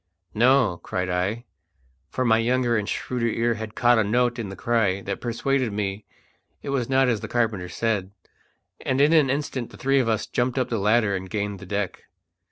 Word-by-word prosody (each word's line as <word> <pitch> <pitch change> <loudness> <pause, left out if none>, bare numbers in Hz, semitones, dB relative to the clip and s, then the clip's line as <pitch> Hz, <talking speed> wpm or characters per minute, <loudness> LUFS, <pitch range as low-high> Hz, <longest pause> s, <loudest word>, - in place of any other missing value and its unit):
"No!" 120 -5 +3
cried 90 0 -3
I, 100 +7 -1 0.6
for 130 - -2
my 110 -1 +4
younger 120 +1 +1
and 105 -2 -1
shrewder 125 -2 -2
ear 115 +1 +1
had 110 -1 -7
caught 120 -1 +4
a - - +3
note 120 +3 +1
in 110 -4 -4
the 95 - -7
cry 105 -5 +1
that - - -5
persuaded 125 +1 0
me 100 0 -3 0.6
it - - -5
was 130 -3 -1
not 135 0 +3
as 115 -4 +1
the 110 - -6
carpenter 110 -6 -1
said; 100 -1 -1 0.7
and 130 - 0
in 145 +3 +5
an 150 -5 +5
instant 135 -3 -2
the - - -14
three 135 +1 +2
of 120 -3 +1
us 110 -1 0
jumped 125 +1 -1
up 130 -1 0
the 115 - -1
ladder 105 0 +2
and 95 0 -5
gained 100 0 -3
the 100 - -11
deck. 100 -1 -3
115 Hz, 200 wpm, -24 LUFS, 100-125 Hz, 0.7 s, in